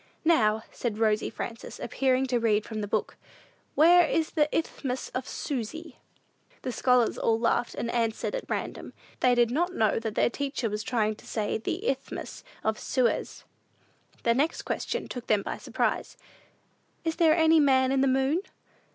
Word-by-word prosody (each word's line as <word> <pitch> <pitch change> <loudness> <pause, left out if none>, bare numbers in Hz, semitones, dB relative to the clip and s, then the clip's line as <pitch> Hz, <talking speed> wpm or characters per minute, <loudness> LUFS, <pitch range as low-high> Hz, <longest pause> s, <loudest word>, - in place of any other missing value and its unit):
"Now," 220 -10 +3
said 230 -4 -3
Rosy 215 -1 +1
Frances, 230 -1 -7
appearing 265 -1 +1
to 250 -2 0
read 215 -2 +2
from 220 -1 -5
the 205 - -3
book, 215 +1 -2 0.6
"where 345 +4 +7
is 320 -1 0
the 300 -2 +2
Isthmus 265 -5 -2
of 255 0 -4
Susy?" 300 +4 -5 0.6
The 255 - -2
scholars 250 -1 +2
all 225 - +2
laughed, 235 +1 0
and 235 - -3
answered 230 - -1
at - - -5
random. - - -4 0.3
They 250 -1 +4
did 240 -1 +3
not 350 +7 0
know 220 -1 +2
that 225 -2 -4
their - - +2
teacher 275 -5 -2
was 210 0 -2
trying 215 -2 0
to - - -16
say 215 -1 -2
the 365 - -3
"Isthmus - - -4 0.2
of 220 0 0
Suez." 255 -3 -1 0.8
The 235 - +4
next 290 +7 0
question - - -3
took 245 -2 -7
them 210 -2 +2
by - - -4
surprise: - - -2 0.9
"Is 325 -1 -2
there 325 -2 +5
any 320 -1 +5
man 260 -3 +4
in 270 -1 +2
the 275 - +3
moon?" 270 +6 +2
250 Hz, 170 wpm, -27 LUFS, 225-300 Hz, 0.9 s, where